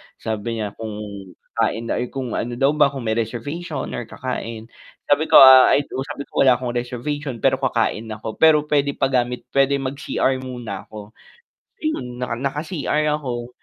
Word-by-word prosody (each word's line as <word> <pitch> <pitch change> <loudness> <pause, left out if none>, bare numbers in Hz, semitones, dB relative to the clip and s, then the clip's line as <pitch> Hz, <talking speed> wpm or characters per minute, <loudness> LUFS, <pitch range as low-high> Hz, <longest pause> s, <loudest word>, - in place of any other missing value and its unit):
Sabi 110 +1 -4
niya 105 -2 -3
kung 110 0 -7 0.6
kakain 115 +1 -1
or - - 0
kung 130 -2 -5
ano 120 +2 -3
daw 135 +3 +3
ba 150 -1 +4
kung 135 -2 -6
may 110 - -1
reservation 130 +8 -3
or 120 - -5
kakain, 115 -2 -6 0.3
sabi 145 +2 +2
ko - - +3
ah, 130 -1 +10
ay 145 - +2
do 135 - -7
sabi 145 -2 -6
ko, - - -3
wala 125 - +7
akong 125 -1 -4
reservation 125 +2 -4
pero 130 -1 +3
kakain 115 -4 0
ako 110 0 -7
pero 155 -2 +6
pwede 140 -1 +2
pagamit 125 -2 0
pwede 140 0 +3
mag-cr 135 -1 -1
muna 120 -6 -7
ako. 105 -1 -10 0.7
Ayun, 125 - -3
naka 120 -2 -2
naka-cr 150 +3 -2 0.2
ako. 120 -4 -5
125 Hz, 165 wpm, -21 LUFS, 115-140 Hz, 0.7 s, ah